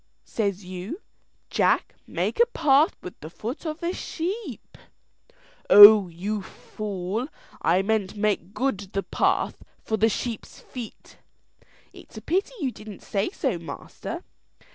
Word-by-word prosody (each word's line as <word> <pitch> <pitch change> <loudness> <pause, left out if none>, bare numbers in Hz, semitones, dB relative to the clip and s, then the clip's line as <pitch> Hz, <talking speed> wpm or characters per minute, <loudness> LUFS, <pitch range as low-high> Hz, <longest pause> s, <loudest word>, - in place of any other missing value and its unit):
Says 200 -3 -2
you, 185 - -6 0.5
'Jack, - - +2
make - - -2
a 475 - +6
path 305 - +3
with 180 - -9
the 155 - -8
foot 235 - -6
of 310 +1 -5
the 345 +1 -1
sheep.'" 350 - -5 0.9
"Oh, 205 -1 +11
you 195 +5 -3
fool, 205 +3 -5 0.3
I 180 +3 +3
meant 210 -2 0
make 205 -3 0
good 265 -6 0
the 195 - -1
path - - 0 0.2
for 220 - -1
the 220 +2 +4
sheep's 230 +1 -5
feet." 240 -4 -10 0.8
"It's - - -14
a - - -6
pity 385 +7 0
you 275 -6 -1
didn't 215 -3 -11
say 200 0 -1
so, 265 - -2
master. 165 - -7
215 Hz, 135 wpm, -25 LUFS, 195-275 Hz, 0.9 s, Oh